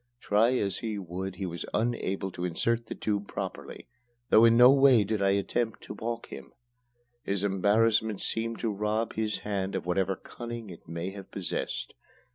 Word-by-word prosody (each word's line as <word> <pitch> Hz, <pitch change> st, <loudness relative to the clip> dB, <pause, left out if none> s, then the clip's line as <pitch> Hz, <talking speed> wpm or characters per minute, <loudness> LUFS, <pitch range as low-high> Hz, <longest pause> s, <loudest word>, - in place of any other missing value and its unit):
Try 115 Hz, +4 st, +3 dB
as 100 Hz, -4 st, -1 dB
he 110 Hz, -2 st, -3 dB
would, 95 Hz, 0 st, -5 dB
he 95 Hz, -, -4 dB
was 85 Hz, -1 st, -4 dB
unable 100 Hz, -4 st, -1 dB
to 90 Hz, -, -6 dB
insert 115 Hz, +7 st, 0 dB
the -, -, -5 dB
tube 105 Hz, -1 st, -2 dB
properly, -, -, -6 dB, 0.4 s
though 110 Hz, -, +8 dB
in 115 Hz, 0 st, +6 dB
no 125 Hz, +2 st, +9 dB
way 135 Hz, -5 st, +6 dB
did 105 Hz, +1 st, -2 dB
I 100 Hz, -, +3 dB
attempt 105 Hz, +3 st, 0 dB
to -, -, -7 dB
balk 115 Hz, +2 st, -4 dB
him. -, -, -10 dB, 0.7 s
His 100 Hz, 0 st, -1 dB
embarrassment 105 Hz, +2 st, +2 dB
seemed 115 Hz, 0 st, -2 dB
to 115 Hz, -3 st, 0 dB
rob 105 Hz, +3 st, -1 dB
his 110 Hz, -1 st, -1 dB
hand 100 Hz, -2 st, -2 dB
of -, -, -3 dB
whatever 95 Hz, +2 st, +1 dB
cunning 120 Hz, 0 st, -8 dB
it 85 Hz, -, -13 dB
may 85 Hz, +3 st, -4 dB
have 100 Hz, -1 st, -10 dB
possessed. 95 Hz, -4 st, -3 dB
105 Hz, 175 wpm, -29 LUFS, 95-115 Hz, 0.7 s, no